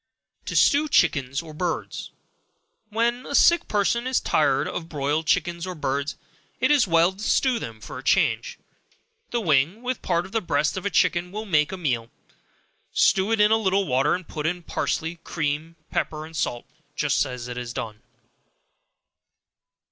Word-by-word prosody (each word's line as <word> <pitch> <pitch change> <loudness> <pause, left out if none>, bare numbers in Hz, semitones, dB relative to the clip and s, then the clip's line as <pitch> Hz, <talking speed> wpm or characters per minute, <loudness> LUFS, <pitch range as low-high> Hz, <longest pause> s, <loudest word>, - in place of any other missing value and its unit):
To - - -4
Stew 300 +2 +4
Chickens 140 - +2
or 155 -2 -10
Birds. 170 +1 -3 0.8
When 235 +5 -1
sick 340 +3 +5
persons 235 +5 +1
are - - -18
tired 140 -3 +2
of 165 -1 -5
broiled 150 +1 -1
chickens, 175 0 0
or 185 - -5
birds, 140 -1 -2 0.4
it - - +3
is 285 -8 +4
well 170 +1 +4
to 190 - -18
stew 245 +3 +2
them 115 - -7
for - - -8
a - - -11
change; 485 0 +1 0.7
the 240 - -1
wing, 165 - +1
with 255 0 -3
part 170 -1 0
of - - -12
the 225 - 0
breast 150 -4 0
of 190 +1 -2
a - - 0
chicken, 180 -2 +1
will 215 +2 -5
make 155 -7 +2
a 190 - -4
meal; 125 -9 -1 0.8
stew 195 +3 +3
it 225 - +2
in 210 +1 +5
a 220 - +5
little 195 -2 +1
water, 135 +2 +2
and 180 -1 -7
put 150 0 -3
in 175 +1 -2
parsley, 165 0 -2
cream, 155 +1 -3 0.2
pepper 155 0 -2
and 160 +1 -12
salt, 120 -5 -2 0.3
just - - +2
as 125 -2 -6
it 125 - -6
is 120 -1 -5
done. 110 -2 -6
170 Hz, 170 wpm, -24 LUFS, 145-210 Hz, 0.8 s, sick